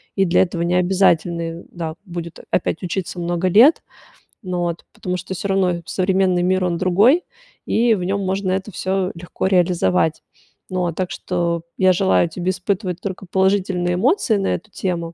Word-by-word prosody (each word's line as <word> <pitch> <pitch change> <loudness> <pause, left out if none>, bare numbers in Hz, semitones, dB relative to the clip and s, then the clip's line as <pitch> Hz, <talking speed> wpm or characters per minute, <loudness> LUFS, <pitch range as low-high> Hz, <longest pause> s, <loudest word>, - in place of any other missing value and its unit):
И 195 - +3
для 180 +1 +4
этого 175 -2 -4
не 175 +1 +1
обязательны, 170 -2 +1
да, 165 -2 -5
будет 170 -2 -7
опять 175 0 -1
учиться 180 0 -3
много 175 +1 -1
лет, 235 - +6 0.6
ну 180 -4 -3
вот, 170 -1 -2
потому 180 0 -3
что 185 +2 -6
всё 200 - -4
равно 180 -3 +1
современный 185 -1 +1
мир- 185 +1 +2
он 175 -1 0
другой, 205 - +4 0.4
и 230 0 +3
в 180 - -4
нём 195 +2 -1
можно 190 0 -1
это 195 +2 -3
всё 185 +1 -1
легко 175 +2 -5
реализовать. 170 - +2 0.5
Ну 185 0 -2
вот, 170 -2 -1
так 185 -1 -2
что 170 -2 -2 0.2
я 185 -1 +4
желаю 190 -1 +3
тебе 180 +2 -3
испытывать 185 -2 -3
только 195 -1 -6
положительные 190 -2 +1
эмоции 235 - +2
на 195 - -1
эту 215 - -10
тему 170 -3 -3
185 Hz, 170 wpm, -20 LUFS, 175-195 Hz, 0.6 s, лет